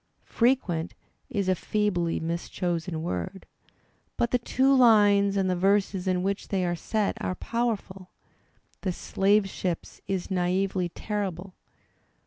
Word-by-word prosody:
"Prequent" 225 -10 +1 0.3
is 205 -7 -1
a 185 - +4
feebly 185 -3 0
mischosen 170 0 -3
word. 90 - -4 0.7
But 235 - +1
the 250 - +2
two 265 +3 +3
lines 205 -5 +5
and 190 -1 +2
the 185 - +1
verses 195 0 +1
in 180 -1 +1
which 195 +1 -2
they 190 -2 0
are 175 0 0
set 210 +4 -1
are 185 - -1
powerful. 205 -5 -3 0.7
"The 185 -3 -1
Slave 200 +3 +2
Ships" 180 -2 -4
is 190 -1 -3
naively 185 0 0
terrible. 195 -2 -4
195 Hz, 125 wpm, -27 LUFS, 180-210 Hz, 0.7 s, lines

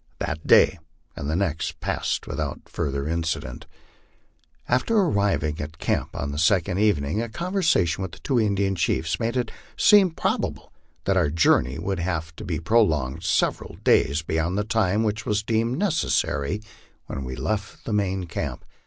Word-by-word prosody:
That 75 +1 -4
day - - +6 0.4
and 70 - -4
the 80 - 0
next 80 -4 -1
passed - - -2
without - - -4
further 70 -2 -2
incident. 80 -1 -3 1.0
After 130 - +2
arriving 100 - +1
at 75 +2 -7
camp - - -1
on 70 - -3
the 70 - -4
second 90 +2 +2
evening, 100 -3 +1
a 115 - -4
conversation 160 - +1
with 95 -3 -4
the - - -9
two 130 -4 0
Indian 100 -2 +1
chiefs 80 -2 0
made 120 +2 -1
it 120 -3 -1 0.3
seem 205 -3 +6
probable 160 - -2 0.3
that 95 -1 +1
our 85 -5 +3
journey 70 -4 +3
would 95 +3 -2
have 80 -2 -3
to - - -7
be 85 -6 -2
prolonged 80 - +2
several - - 0
days 70 +4 +3
beyond 80 +4 -1
the 105 - +1
time 110 -1 +1
which 110 +1 -2
was 105 0 +1
deemed 115 +3 0
necessary 105 - 0 0.4
when 70 - -5
we 65 0 -5
left 110 +6 -3
the 110 - -2
main 95 -2 0
camp. 85 - -5
95 Hz, 160 wpm, -24 LUFS, 80-110 Hz, 1.0 s, day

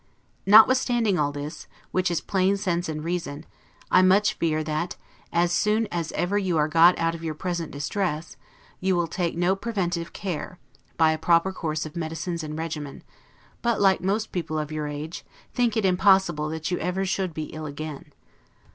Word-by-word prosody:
Notwithstanding 225 -2 +5
all 145 -1 +1
this, 145 +2 -7 0.2
which 185 -1 +1
is 170 - -1
plain 195 0 +1
sense 175 -3 -1
and 155 -1 -4
reason, 165 -3 -4 0.5
I - - +6
much 195 +3 +4
fear 155 -2 0
that, 155 +3 -2 0.4
as 170 0 +2
soon 210 +5 +2
as 170 -2 -2
ever 195 +4 0
you 185 -4 0
are 150 0 +3
got 165 +3 +6
out 165 0 0
of 165 0 -8
your 160 -2 -3
present 175 -1 -3
distress, 155 +2 -3 0.4
you 190 0 +1
will 175 -1 +1
take 170 0 -2
no 175 +2 +2
preventive 180 -6 -2
care, 180 -1 -5 0.4
by 160 -1 +5
a 160 - -2
proper 170 +3 +3
course 155 -3 -3
of 155 - -9
medicines 165 +1 -3
and 155 0 -5
regimen; 155 -3 -5 0.6
but, 235 -2 +1
like 195 -1 +4
most 210 +4 -1
people 165 -3 -3
of 150 0 -3
your 155 -1 -3
age, 150 +3 -6 0.3
think 240 -3 +1
it 215 - +1
impossible 185 -4 +3
that 160 +2 -4
you 180 - 0
ever 190 +2 -1
should 190 -1 -1
be 155 0 -6
ill 155 0 -5
again. 145 0 -7
170 Hz, 180 wpm, -25 LUFS, 155-190 Hz, 0.6 s, I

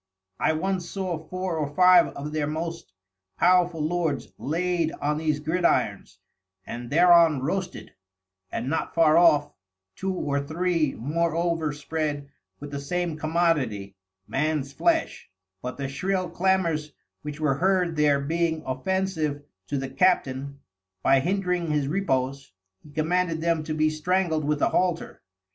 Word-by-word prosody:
I - - +2
once 180 +2 -2
saw 185 -4 -3
Four 180 +1 -4
or 145 -1 -3
Five 180 -1 +7
of 145 +2 -5
their 150 -1 -1
most 165 - -5 0.5
Powerful 180 -3 +3
Lords 160 -3 -1
laid 170 +1 0
on 150 +1 -1
these 155 -2 0
Gridirons, 165 +4 0 0.5
and 120 0 -7
thereon 170 -2 +5
roasted, 185 +5 -3 0.6
and 120 - -3
not 160 +4 -2
far 160 -2 +5
off, 165 -4 +5 0.4
Two 190 0 -2
or 145 -6 -1
Three 160 0 0
more 160 +6 -1
over 165 -2 0
spread 145 -1 -3 0.3
with 145 0 -8
the 140 - -4
same 175 +3 -2
Commodity, 150 - 0 0.3
Man's 140 -1 -1
Flesh; 330 -1 0 0.3
but 125 0 -5
the 140 - -5
shril 180 +6 -2
Clamours 170 -5 0 0.3
which 150 0 -7
were 150 -3 +2
heard 180 -2 +2
there 150 -2 +3
being 160 +2 -1
offensive 155 +1 -1 0.2
to 145 - -2
the 135 0 -3
Captain, 140 -4 +1 0.4
by 135 - +5
hindring 180 +1 -1
his 150 -2 0
Repose, 135 - -1 0.3
he - - -16
commanded 165 +2 0
them 165 -1 0
to 155 -1 -3
be 155 0 +2
strangled 160 0 0
with 150 -1 0
a - - +4
Halter. 180 -2 -1
160 Hz, 140 wpm, -25 LUFS, 145-175 Hz, 0.6 s, Five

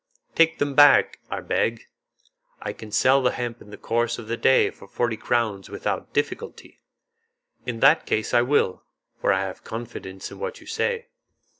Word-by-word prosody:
"Take 165 0 +3
them 145 -1 -1
back, 145 +1 +6
I - - -3
beg. 115 0 -1 0.8
I - - -5
can 110 -1 -11
sell 130 +5 +4
the 125 - +3
hemp 120 -1 -4
in 105 - -14
the 105 - -10
course 120 0 -1
of 115 - -9
the 115 - -1
day 130 - +4
for 100 - -15
forty 120 +3 -1
crowns 110 -3 -1
without - - -3
difficulty." - - -4 0.9
"In 115 -2 -4
that - - +5
case 110 -1 -1
I 120 - +6
will, 125 -7 +1 0.4
for - - +2
I 95 - +2
have 95 -1 -6
confidence 95 -5 -7
in - - -11
what 485 +1 -5
you - - -16
say." 475 -1 -2
120 Hz, 175 wpm, -24 LUFS, 110-135 Hz, 0.9 s, back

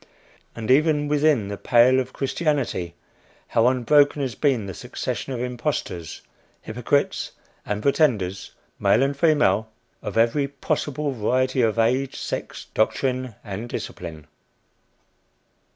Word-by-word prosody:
And 115 +1 -2
even 150 +1 +3
within 145 -7 +2
the 100 - -4
pale 125 +2 +5
of 130 0 -3
Christianity, 135 - -1 0.5
how 115 +1 +3
unbroken 140 +3 +3
has 130 -3 -2
been 130 -3 +1
the 95 - -6
succession 135 - -5
of 125 - -3
impostors, 125 - -3 0.4
hypocrites 125 +5 -1 0.3
and 105 +1 -2
pretenders, 115 - +1 0.3
male 125 - +4
and 140 +1 0
female, 140 - +3 0.3
of - - -5
every 120 +5 +3
possible 140 +1 -2
variety 130 +2 +1
of 115 -1 +1
age, 125 +4 +1
sex, - - -5
doctrine 130 +1 0
and 105 +3 -6
discipline! 80 -9 -6
125 Hz, 120 wpm, -23 LUFS, 110-140 Hz, 0.5 s, pale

